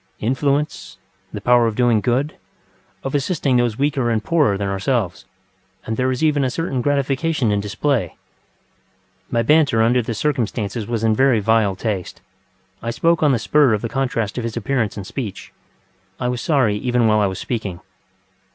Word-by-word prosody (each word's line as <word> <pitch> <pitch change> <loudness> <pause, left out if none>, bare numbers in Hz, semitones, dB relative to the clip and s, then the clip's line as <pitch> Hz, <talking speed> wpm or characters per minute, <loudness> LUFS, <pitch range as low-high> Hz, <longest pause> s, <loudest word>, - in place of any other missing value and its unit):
Influence, 140 +5 -1 0.3
the - - -5
power 120 -1 +4
of 110 - -2
doing 120 -3 +3
good, 130 +7 0 0.7
of 135 - -4
assisting 140 -2 +1
those 120 -3 +1
weaker 140 -3 0
and 115 -2 0
poorer 150 -12 +2
than 100 0 -2
ourselves; 95 -1 -1 0.6
and 110 - -2
there 130 +2 0
is 130 +3 -2
even 150 -3 +2
a 130 - +1
certain 135 -2 -2
gratification 140 -1 0
in 105 - +1
display..... 115 +6 -1 1.2
ŌĆØ - - -32
My 115 -1 +1
banter 145 -5 +4
under 120 +2 +3
the 115 0 -4
circumstances 115 -5 -2
was 115 -2 -2
in 110 -1 +3
very 130 -2 +3
vile 105 -2 +2
taste. 100 -3 -4 0.6
I 115 - -3
spoke 165 +7 +1
on 150 -2 +4
the 130 - +2
spur 135 +2 +3
of 105 - -6
the 115 - -2
contrast 125 -4 -2
of - - -4
his 115 0 -4
appearance 115 -3 -1
and 100 - -6
speech. 110 -2 -6 0.7
I 125 - -1
was 125 -1 -3
sorry 130 -10 +2
even 125 +1 +1
while 110 -1 +4
I 105 - +3
was 95 -1 -4
speaking. 105 -8 -4
120 Hz, 180 wpm, -20 LUFS, 110-135 Hz, 1.2 s, power